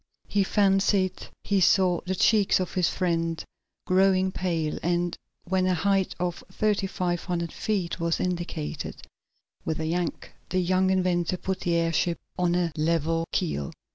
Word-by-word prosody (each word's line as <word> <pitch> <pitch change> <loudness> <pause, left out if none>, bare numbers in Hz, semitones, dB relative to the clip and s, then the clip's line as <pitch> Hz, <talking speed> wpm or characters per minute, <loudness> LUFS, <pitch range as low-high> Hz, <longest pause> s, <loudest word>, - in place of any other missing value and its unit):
He 200 -1 +2
fancied 195 -1 +2 0.2
he 200 -2 +1
saw 180 -1 +4
the 190 - 0
cheeks 205 +1 +4
of 185 - -3
his 180 -3 +2
friend 165 -3 -1 0.4
growing 190 0 +3
pale, 165 -5 -2
and, 175 +1 0 0.3
when 185 +1 +1
a 185 - +2
height 195 +2 +1
of 175 -1 -2
thirty 205 0 +1
five 180 -3 -2
hundred 170 -2 -2
feet 190 -5 -2
was 170 0 0
indicated, 170 -4 -3 0.6
with 160 - -2
a 160 - -2
yank 170 +1 -2 0.2
the 185 - +1
young 185 +1 +2
inventor 180 -2 +1
put 190 +1 -3
the 170 -1 0
airship 170 +1 +1 0.2
on 175 -1 +1
a 175 -2 +1
level 165 +1 +1
keel. 155 - -1
180 Hz, 150 wpm, -26 LUFS, 170-190 Hz, 0.6 s, saw